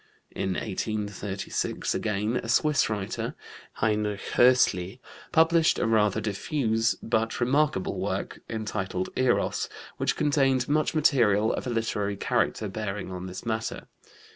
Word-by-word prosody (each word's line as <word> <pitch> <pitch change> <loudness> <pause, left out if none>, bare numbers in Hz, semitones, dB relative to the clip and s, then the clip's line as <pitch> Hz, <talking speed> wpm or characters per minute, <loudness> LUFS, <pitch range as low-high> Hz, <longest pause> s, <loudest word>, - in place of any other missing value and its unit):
In 95 -1 -2
1836, 100 -1 -3
again, 105 +2 -1
a 115 - -5
Swiss 150 +3 +3
writer, 105 -3 -3 0.4
Heinrich 105 -2 -1
Hössli, 120 -5 +3 0.3
published 165 0 +4
a - - 0
rather 110 -2 +3
diffuse 110 +2 0
but 115 0 0
remarkable 130 -4 +1
work, - - -3
entitled 95 -4 -3
Eros, 130 -1 +1 0.3
which - - 0
contained 135 -3 +2
much 155 +2 +1
material 115 -8 +3
of - - -4
a - - -1
literary 105 -3 -1
character 105 - 0
bearing 100 -1 -4
on 90 0 -5
this 95 +4 -8
matter. 115 0 -3
110 Hz, 120 wpm, -27 LUFS, 100-125 Hz, 0.4 s, published